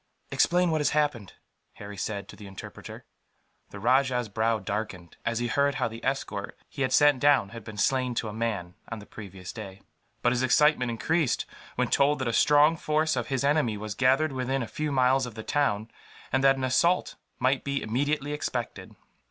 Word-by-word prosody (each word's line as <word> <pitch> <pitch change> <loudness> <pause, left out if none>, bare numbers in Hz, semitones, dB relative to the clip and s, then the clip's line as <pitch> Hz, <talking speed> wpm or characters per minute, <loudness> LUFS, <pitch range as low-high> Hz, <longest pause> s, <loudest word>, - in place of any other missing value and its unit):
"Explain 175 0 +3
what 155 -1 +1
has 150 +1 +1
happened," 130 -10 0 0.4
Harry 105 0 -9
said, 100 0 -4
to - - -11
the 105 - -11
interpreter. 95 -2 -10 0.6
The 100 - -9
rajah's 125 0 +2
brow 110 +2 +1
darkened, 100 -3 -5
as 115 -1 0
he 120 - -1
heard 140 +3 +1
how - - 0
the 115 +1 -9
escort 120 -7 -3
he 140 - -8
had 130 -1 +1
sent 145 0 +5
down 140 -7 +4
had 115 0 -9
been 105 0 -9
slain, 130 +2 +1
to 115 - -1
a 105 - -6
man, 105 -6 -3 0.2
on 115 - -3
the 105 - -11
previous 95 -4 -9
day. 100 -4 -9 0.4
But 120 - +4
his 125 0 0
excitement 130 0 +3
increased, 150 +5 0 0.3
when - - 0
told 145 +2 +3
that 130 -3 -2
a 115 - -1
strong 150 +6 +5
force 155 0 +1
of 120 -2 -2
his 135 -2 -1
enemy 140 -7 +2
was 105 0 -5
gathered 135 +6 +2
within 130 0 -1
a - - -6
few 155 -2 -3
miles 130 -1 +3
of 115 - -10
the 110 - -6
town; 110 -7 0 0.4
and 135 +1 +1
that 135 0 +5
an 130 - -4
assault 170 +8 +2 0.3
might 130 +1 +1
be 140 0 -2
immediately 145 +5 -1
expected. 125 -5 -4
125 Hz, 195 wpm, -27 LUFS, 110-140 Hz, 0.6 s, sent